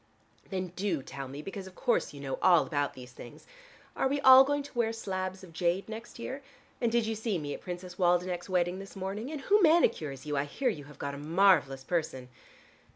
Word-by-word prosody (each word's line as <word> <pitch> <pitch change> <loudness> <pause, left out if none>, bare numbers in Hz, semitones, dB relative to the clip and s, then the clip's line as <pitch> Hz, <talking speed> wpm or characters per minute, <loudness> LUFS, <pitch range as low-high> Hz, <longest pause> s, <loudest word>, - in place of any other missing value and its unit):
"Then 185 -2 -3
do 180 -5 -2
tell 135 +1 -7
me, 140 +3 -8
because 195 +1 -7
of 185 - -13
course 240 - 0
you 145 - -11
know 135 -1 -4
all 175 -3 +5
about 145 -2 -1
these 125 -1 -11
things: 120 -1 -12 0.5
Are - - +1
we 285 +2 0
all 260 0 +10
going 290 +1 -1
to 280 - -13
wear 235 -2 +1
slabs 190 -4 -4
of 175 -3 -13
jade 175 +3 0
next 225 +1 -8
year? 265 +4 -6 0.4
And 235 -2 +2
did 235 -1 +2
you 225 - -1
see 220 -2 -2
me 145 -3 -4
at - - -8
Princess 180 0 -7
Waldenech's 180 0 +1
wedding 180 0 +1
this 195 +1 -10
morning? 195 +6 -4
And 300 -3 -5
who 415 +9 +3
manicures 220 - +3
you? 150 -1 -2
I 140 0 0
hear 250 - -1
you 150 -11 -5
have 150 +1 -14
got 140 0 -4
a 140 - -7
marvelous 155 -4 +3
person." 135 -6 -2
185 Hz, 220 wpm, -30 LUFS, 150-220 Hz, 0.5 s, all